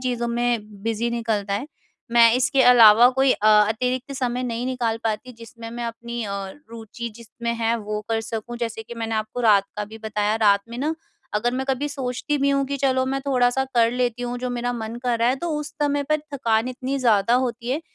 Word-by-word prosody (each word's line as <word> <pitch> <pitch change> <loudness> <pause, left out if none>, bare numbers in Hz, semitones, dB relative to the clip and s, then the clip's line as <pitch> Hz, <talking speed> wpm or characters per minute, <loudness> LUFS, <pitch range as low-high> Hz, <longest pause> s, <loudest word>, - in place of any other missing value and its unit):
चीज़ों 245 -2 -2
में 235 -4 -2
बिज़ी 230 +1 -1
निकलता 220 -4 -1
है। 210 +8 -3 0.5
मैं 230 -1 +7
इसके 265 +2 +3
अलावा 235 -1 +8
कोई 265 0 +4
अ, 215 - -1 0.2
अतिरिक्त 250 +4 -2
समय 250 -2 -2
नहीं 240 -1 -3
निकाल 245 -3 -1
पाती 225 +3 -2
जिसमें 230 0 -11
मैं 240 +1 -5
अपनी 235 +1 -5
अ, 205 - -5 0.4
रुचि 230 +1 -7
जिसमें 235 0 -5
है 230 0 0
वो 210 -1 -4
कर 225 -1 0
सकूँ। 225 +1 -6
जैसे 230 -2 -4
कि 235 +2 -10
मैंने 225 -1 -3
आपको 215 +2 -3
रात 210 -4 +5
का 210 - -2
भी 220 +2 -11
बताया, 210 -1 -1
रात 205 -2 +4
में 235 +1 -7
ना 300 +4 -1 0.4
अगर 235 +3 +1
मैं 265 +1 -2
कभी 270 +2 0
सोचती 270 +1 -3
भी 280 0 +2
हूँ 275 0 +2
कि 280 +1 -3
चलो 260 -1 +1
मैं 270 +1 -1
थोड़ा-सा 255 -1 +2
कर 230 -1 +4
लेती 245 -1 -1
हूँ 245 0 -3
जो 250 +1 -3
मेरा 245 0 -2
मन 225 -1 -5
कर 245 -2 0
रहा 230 +1 +3
है। 255 - +1
तो 345 - -1
उस 300 0 -5
समय 290 0 +1
पर 305 +2 +1 0.2
थकान 230 -3 +1
इतनी 255 +2 -3
ज़्यादा 230 -3 +3
होती 245 -1 -1
है 285 +4 0
235 Hz, 215 wpm, -23 LUFS, 225-255 Hz, 0.5 s, अलावा